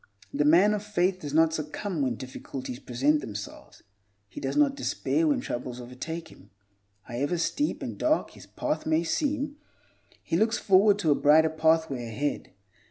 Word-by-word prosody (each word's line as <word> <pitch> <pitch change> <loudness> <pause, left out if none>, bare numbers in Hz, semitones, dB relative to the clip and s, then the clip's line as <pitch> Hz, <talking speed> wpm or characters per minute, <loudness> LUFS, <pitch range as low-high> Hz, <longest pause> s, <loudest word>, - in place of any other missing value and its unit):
The 145 - +1
man 180 +8 +5
of 210 - -2
faith 185 -2 0
does 145 -5 -6
not 160 +1 +4
succumb 160 +3 -3
when 130 -3 0
difficulties 130 0 -7
present 140 +5 +1
themselves; 105 -1 -9 0.4
he - - -9
does 135 - -2
not 290 -2 +4
despair 320 +3 0
when 285 -4 +2
troubles 125 - -5
overtake 145 +7 -7
him. 95 - -17 0.5
However 140 +8 -2
steep 290 - -1
and - - -6
dark 310 0 +1
his - - -14
path 300 - -3
may 160 +1 +2
seem, 290 - -1 0.7
he 165 - 0
looks 220 +4 +2
forward 200 +1 +4
to 165 -7 +1
a - - +7
brighter 155 +3 +4
pathway 160 -6 +1
ahead. 140 +6 -3
160 Hz, 165 wpm, -27 LUFS, 135-205 Hz, 0.7 s, a